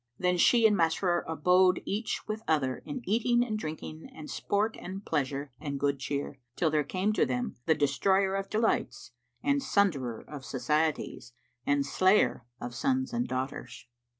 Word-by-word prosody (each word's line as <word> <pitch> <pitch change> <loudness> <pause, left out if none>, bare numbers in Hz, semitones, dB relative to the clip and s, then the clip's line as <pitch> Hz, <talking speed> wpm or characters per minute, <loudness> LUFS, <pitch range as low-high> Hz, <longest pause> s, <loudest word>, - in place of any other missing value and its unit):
Then 180 -1 +1
she 235 +5 +5
and 210 -1 +6
Masrur 175 0 +2
abode 180 +3 +4
each 215 +3 -3
with 215 0 -3
other 135 -5 +1
in 265 -4 -5
eating 240 +3 +3
and 220 -3 -3
drinking 155 -1 -7
and 155 -1 -9
sport 210 +2 0
and 190 +3 -7
pleasure 140 -2 -2
and 140 -2 -4
good 140 -1 0
cheer, 140 0 -4 0.2
till 160 -3 +1
there 150 -1 +2
came 190 +7 -1
to - - +3
them 245 -3 -2
the 160 - +5
Destroyer 190 +8 +2
of 195 0 -2
delights 220 - 0 0.3
and 280 0 +2
Sunderer 145 - 0
of 145 -3 -8
societies 135 -2 -1 0.3
and 145 -1 +2
Slayer 185 - +3
of 120 0 -6
sons 260 - 0
and 240 +1 0
daughters. 130 +1 -5
175 Hz, 160 wpm, -29 LUFS, 145-210 Hz, 0.3 s, and